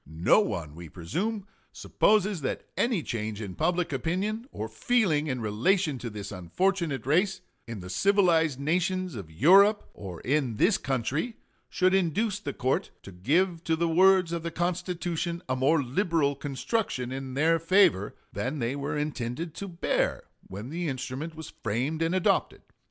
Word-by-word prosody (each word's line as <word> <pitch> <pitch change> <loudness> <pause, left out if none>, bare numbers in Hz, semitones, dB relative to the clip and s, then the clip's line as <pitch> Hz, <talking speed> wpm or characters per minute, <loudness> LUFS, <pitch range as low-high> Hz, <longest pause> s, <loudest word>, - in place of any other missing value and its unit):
No 80 - +3
one, 85 - -2
we 85 0 -10
presume, 190 - -3 0.3
supposes 205 -4 +1
that 135 - -3
any 230 -9 +1
change 110 -3 -4
in 100 -4 -6
public 175 - 0
opinion 195 - -2
or 110 - -4
feeling 155 - +1
in 130 -4 -2
relation 135 - +1
to 120 - -5
this 105 -2 -7
unfortunate 150 - -1
race, 185 +6 +2 0.3
in 115 -4 -6
the 90 - -9
civilized 165 - +3
nations 180 +4 0
of 100 -9 -7
Europe 195 - +5
or 90 -4 -8
in 130 -4 0
this 190 - +3
country, 140 - -2 0.3
should 185 0 +2
induce 195 +3 +1
the 145 - -4
court 130 0 -1
to 100 - -10
give 165 - +1
to 165 - +2
the 170 +1 0
words 185 +1 +4
of 170 -1 -2
the 170 - -3
Constitution 175 0 -2
a 130 - 0
more 140 +4 +2
liberal 145 +1 +1
construction 140 - -2
in 130 -1 -5
their 165 +3 +3
favor 165 - +3 0.2
than 125 +9 -2
they 125 0 -1
were 145 +1 -3
intended 150 +2 -3
to 200 - -6
bear 170 -2 -1 0.2
when 100 +6 -7
the 170 +1 -3
instrument 135 +4 -4
was 160 -1 -8
framed 125 +9 -1
and 165 +2 +1
adopted.... 185 - +1
155 Hz, 160 wpm, -28 LUFS, 125-185 Hz, 0.3 s, Europe